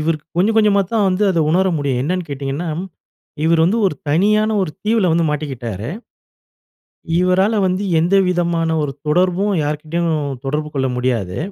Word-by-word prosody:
இவருக்கு 155 -1 -2
கொஞ்சம், 215 +5 +2
கொஞ்சமா 210 -2 +4
தான் 210 -3 +2
வந்து 185 +2 0
அத 170 - +1
உணர 185 +3 +3
முடியும். 135 -4 -1
என்னன்னு 180 +4 -2
கேட்டீங்கன்னா, 140 +4 -4 0.8
இவரு 165 0 +3
வந்து 200 +7 +2
ஒரு 170 - -1
தனியான 210 +8 +2
ஒரு 170 - -3
தீவுல 215 -5 +2
வந்து 165 0 +2
மாட்டிக்கிட்டாரு. 125 -7 -4 1.3
இவரால 190 +4 +2
வந்து 185 +2 -1 0.2
எந்த 175 +4 +2
விதமான 170 -2 0
ஒரு 145 - -2 0.2
தொடர்பும், 180 +5 +2
யார் 150 0 -2
கிட்டயும் 165 +1 -1 0.3
தொடர்பு 150 +2 -2
கொள்ள 130 -1 +1
முடியாது. 115 -8 -1
170 Hz, 150 wpm, -18 LUFS, 145-190 Hz, 1.3 s, கொஞ்சமா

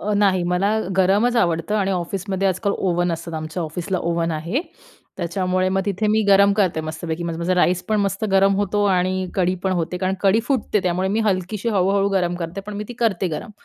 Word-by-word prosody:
अ, 210 - -2
नाही, 195 -3 +3
मला 195 +5 +1 0.2
गरमच 200 +6 +3
आवडतं 170 -2 +1
आणि 195 -2 +1
ऑफिसमध्ये 190 +2 -1
आजकाल 200 +2 -1
ओव्हन 175 -2 0
असतात, 165 0 -6
आमच्या 155 +2 -4
ऑफिसला 175 +4 -3
ओव्हन 170 -1 -1
आहे. 170 - -2 0.6
त्याच्यामुळे 185 +1 0
मग 190 +1 +1
तिथे 200 +2 -1
मी 215 +1 +3
गरम 200 0 +6
करते 185 -6 +1
मस्तपैकी. 160 +1 -5
म 170 - -2
माझा 170 +2 0
राईस 180 0 +2
पण 215 - +2
मस्त 195 +1 -1
गरम 195 0 +4
होतो 205 0 0
आणि 185 0 +1
कढी 185 -1 +1
पण 190 - +1
होते 175 0 -2
कारण 185 +1 0
कढी 200 +3 +3
फुटते 245 -6 +1
त्यामुळे 185 +1 0
मी 225 - +1
हलकीशी, 205 +1 -1
हळू-हळू 195 -1 +2
गरम 180 -3 0
करते, 175 +2 -5
पण 210 - -6
मी 210 - -4
ती - - -6
करते 195 -6 +1
गरम 160 +8 -5
185 Hz, 200 wpm, -21 LUFS, 175-200 Hz, 0.6 s, गरम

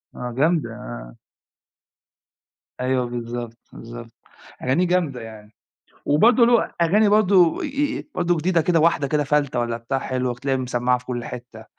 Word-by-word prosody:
آه 125 0 -5
جامدة 160 +3 +2
آه. - - -9 1.7
أيوه 130 0 0
بالضبط، 120 -1 -6 0.2
بالضبط، 115 0 -10 0.5
أغانيه 160 +8 +1
جامدة 165 -9 0
يعني، 110 -1 -11 0.5
وبرضو 225 - +4
له، 235 -1 +3
أغاني 205 +6 +3
برضو 195 -5 +4
أ - - -3 0.3
أ - - -8
برضو 175 -1 +1
جديدة 170 +2 +1
كده 165 0 +2
واحدة 155 -3 +2
كده 150 0 0
فَلتة 140 -2 0
والّا 120 -1 -2
بتاع 120 +4 -3
حلو 130 -1 -2
هتلاقيها 130 +2 -2
مِسمعة 125 0 0
في 125 - -18
كل 120 -1 -4
حتّة، 120 -2 -9
130 Hz, 150 wpm, -22 LUFS, 120-170 Hz, 1.7 s, وبرضو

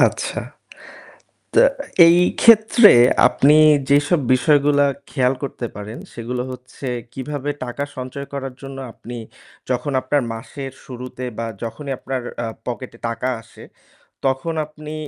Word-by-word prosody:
আচ্ছা, - - +1 1.1
তো - - +3 0.5
এই 170 - +6 0.2
ক্ষেত্রে 225 0 +7 0.4
আপনি 145 +2 +4 0.3
যেসব 145 +3 +3
বিষয়গুলা 145 +1 +3 0.3
খেয়াল 130 -2 +1
করতে 125 -3 -4
পারেন 105 +3 -7 0.2
সেগুলো 125 +1 -4
হচ্ছে 125 +2 -10 0.3
কিভাবে 145 +2 -4
টাকা 125 +3 -4
সঞ্চয় 130 +2 -6
করার 135 -2 -5
জন্য 135 0 -8
আপনি 120 +1 -9 0.5
যখন 125 +3 -1
আপনার 140 +2 0
মাসের 135 +4 -7
শুরুতে 125 0 -7
বা 115 - -2 0.2
যখনই 135 +4 -5
আপনার 130 -2 -4 0.2
আ - - -2 0.2
পকেটে 125 -1 -6
টাকা 115 +2 -3
আসে 115 - -16 0.6
তখন 135 +5 0
আপনি 155 0 -10
135 Hz, 125 wpm, -20 LUFS, 125-145 Hz, 1.1 s, ক্ষেত্রে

